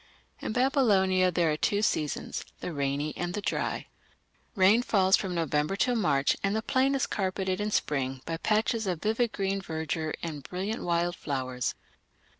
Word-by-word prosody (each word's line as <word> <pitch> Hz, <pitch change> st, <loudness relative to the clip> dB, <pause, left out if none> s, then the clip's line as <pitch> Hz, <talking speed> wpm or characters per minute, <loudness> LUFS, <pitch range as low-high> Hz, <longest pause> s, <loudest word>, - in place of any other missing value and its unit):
In -, -, -4 dB
Babylonia 205 Hz, -8 st, +3 dB
there 170 Hz, -2 st, +2 dB
are 150 Hz, -, -1 dB
two 205 Hz, +5 st, +1 dB
seasons 150 Hz, -8 st, -1 dB, 0.2 s
the 175 Hz, -, -5 dB
rainy 140 Hz, +1 st, -1 dB
and 175 Hz, +1 st, -3 dB
the -, -, -1 dB
dry. -, -, -2 dB, 0.7 s
Rain 200 Hz, +4 st, +5 dB
falls 195 Hz, -5 st, +4 dB
from 185 Hz, -2 st, -3 dB
November 155 Hz, +1 st, 0 dB
till 250 Hz, +5 st, +2 dB
March, 140 Hz, -11 st, +2 dB
and 200 Hz, +1 st, +1 dB
the 220 Hz, -, -1 dB
plain 270 Hz, +3 st, +2 dB
is 270 Hz, -, +1 dB
carpeted 190 Hz, -1 st, -1 dB
in 210 Hz, -, 0 dB
spring 135 Hz, -8 st, -1 dB
by 165 Hz, 0 st, -3 dB
patches 220 Hz, +3 st, +1 dB
of 180 Hz, -3 st, -1 dB
vivid 225 Hz, +2 st, +1 dB
green 195 Hz, 0 st, -1 dB
verdure 160 Hz, -2 st, -3 dB
and 155 Hz, -4 st, -4 dB
brilliant 190 Hz, +9 st, -4 dB
wild 175 Hz, 0 st, 0 dB
flowers. 130 Hz, -5 st, -3 dB
185 Hz, 165 wpm, -28 LUFS, 155-210 Hz, 0.7 s, Rain